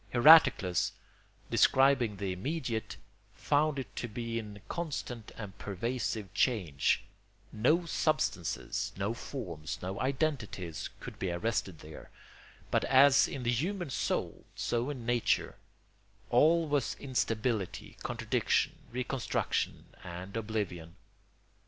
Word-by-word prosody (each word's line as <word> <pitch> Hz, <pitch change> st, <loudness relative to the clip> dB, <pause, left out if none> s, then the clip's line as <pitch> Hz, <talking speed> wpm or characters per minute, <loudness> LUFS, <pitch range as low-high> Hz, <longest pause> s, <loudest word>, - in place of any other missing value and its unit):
Heraclitus, 120 Hz, -, +6 dB, 0.6 s
describing 130 Hz, -6 st, +4 dB
the 95 Hz, -1 st, -2 dB
immediate, 115 Hz, -, -3 dB, 0.4 s
found 150 Hz, 0 st, +1 dB
it 125 Hz, -7 st, -6 dB
to 120 Hz, -, -2 dB
be 115 Hz, +1 st, -3 dB
in 105 Hz, -2 st, -8 dB
constant 135 Hz, -9 st, -4 dB
and 100 Hz, -4 st, -7 dB
pervasive 105 Hz, -1 st, -3 dB
change: 95 Hz, -, +1 dB, 0.5 s
no 155 Hz, +11 st, +2 dB
substances, 155 Hz, -, -1 dB
no 100 Hz, +3 st, -1 dB
forms, 90 Hz, -, -6 dB
no 95 Hz, +2 st, -5 dB
identities 130 Hz, -, -2 dB
could -, -, -9 dB
be 95 Hz, -, -1 dB
arrested 95 Hz, -2 st, -2 dB
there, 75 Hz, 0 st, -11 dB, 0.6 s
but -, -, +2 dB
as 135 Hz, +1 st, +6 dB
in 130 Hz, -, -5 dB
the 120 Hz, -, +2 dB
human 175 Hz, -, -2 dB
soul, -, -, -2 dB
so 120 Hz, +3 st, -1 dB
in 130 Hz, -5 st, -5 dB
nature, 120 Hz, -2 st, +1 dB, 0.7 s
all 160 Hz, +6 st, +5 dB
was 145 Hz, -5 st, 0 dB
instability, 115 Hz, -6 st, -2 dB
contradiction, -, -, 0 dB, 0.2 s
reconstruction, 125 Hz, +1 st, -2 dB, 0.2 s
and 90 Hz, +3 st, -7 dB
oblivion. 100 Hz, -7 st, -3 dB
115 Hz, 110 wpm, -31 LUFS, 100-135 Hz, 0.7 s, Heraclitus